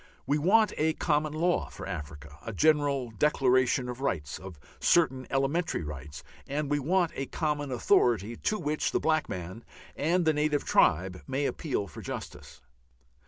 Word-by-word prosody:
We 145 +1 +1
want 210 +7 +4
a 160 +1 +2
common 150 -2 0
law 175 +3 0
for - - -9
Africa, 75 -2 -7
a 115 - -5
general 145 -1 +2
Declaration 130 0 +2
of 125 +1 -6
Rights, 80 - -2
of 90 -5 -10 0.2
certain 135 -7 +2
elementary 140 - 0
rights, 75 -1 -8 0.2
and 145 +1 -2
we 145 - +2
want 175 +4 +1
a 135 - -4
common 150 -3 -2
authority 120 -2 +2
to 215 - -1
which 150 -4 -1
the - - +2
black 155 0 +1
man 95 +5 -6 0.3
and 170 +4 +1
the 160 - +4
native 150 -1 0
tribe 90 +3 +2
may 135 +2 -1
appeal 135 -8 -2
for 85 - -10
justice. - - -8
140 Hz, 160 wpm, -29 LUFS, 100-155 Hz, 0.3 s, want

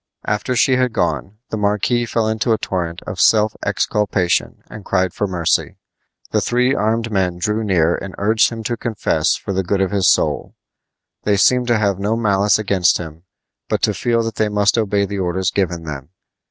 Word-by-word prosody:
After 105 +5 -1
she 130 +1 +3
had 125 -2 0
gone 100 0 -2
the 110 - -2
marquis 105 +4 0
fell 115 -1 0
into 110 +2 0
a - - +1
torrent 85 -5 -4
of - - -4
self 110 -1 +4
exculpation 100 -4 0
and 110 - -10
cried 95 -2 0
for 105 - -2
mercy. 90 -3 0 0.5
The - - +1
three 125 +2 +1
armed 115 -1 0
men 95 -3 0
drew 105 +5 -1
near 85 -5 +2
and 95 -2 -8
urged 110 +2 +3
him 115 -1 -7
to 120 +2 -2
confess 100 -10 0
for 100 - -5
the 95 - 0
good 95 +2 -1
of 95 0 0
his 100 -3 +2
soul. - - 0 0.7
They 105 -1 +1
seemed 125 +4 +3
to 120 -2 +3
have 100 -3 0
no 105 +3 0
malice 105 -3 +2
against 100 -4 +2
him, 80 0 -9 0.4
but - - -1
to - - +3
feel 115 -1 0
that 115 -1 -5
they 110 -1 +1
must 105 0 +2
obey 100 -3 +1
the 100 0 -5
orders 90 -1 -1
given 90 -4 -1
them. 70 -3 -7
105 Hz, 195 wpm, -19 LUFS, 95-110 Hz, 0.7 s, self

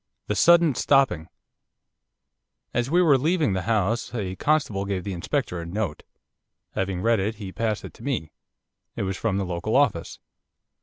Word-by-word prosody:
THE - - -1
SUDDEN 170 - +5
STOPPING 125 - +2 1.5
As 120 +2 0
we 175 +4 +4
were 145 -6 +5
leaving 155 - +1
the 95 - -1
house 115 +2 0
a 95 -5 -3
constable 140 -10 +1
gave 95 -2 -2
the 100 - -4
Inspector 95 - -2
a - - -6
note. 90 -1 -3 0.7
Having 95 -1 -2
read 115 -1 +3
it 105 +4 -1
he 100 -3 -7
passed 110 0 -2
it - - -9
to - - -15
me. 120 - -2 0.6
It - - -2
was 95 0 -2
from 100 -1 -1
the 100 - -1
local 90 +6 -2
office. 135 -12 +1
110 Hz, 165 wpm, -25 LUFS, 95-135 Hz, 1.5 s, SUDDEN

